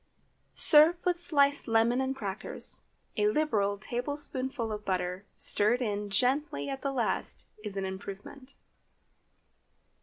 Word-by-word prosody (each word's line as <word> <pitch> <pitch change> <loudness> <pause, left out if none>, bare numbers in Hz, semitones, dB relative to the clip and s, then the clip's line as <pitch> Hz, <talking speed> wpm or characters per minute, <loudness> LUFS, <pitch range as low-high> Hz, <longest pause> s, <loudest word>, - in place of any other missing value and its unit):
Serve 310 +2 +7
with 355 -1 +1
sliced 285 -4 +2
lemon 230 +2 +2
and 265 0 -2
crackers. 200 -5 -3 0.4
A 420 - +2
liberal 220 - 0
tablespoonful 255 +1 -3
of 210 0 -5
butter 185 0 -3
stirred 215 +4 +4
in 205 -4 -3
gently 250 - -1
at 270 0 -5
the 275 - -2
last 245 -5 -3 0.2
is 205 -2 -6
an 195 - -2
improvement. 200 +8 -9
240 Hz, 120 wpm, -29 LUFS, 205-280 Hz, 0.4 s, Serve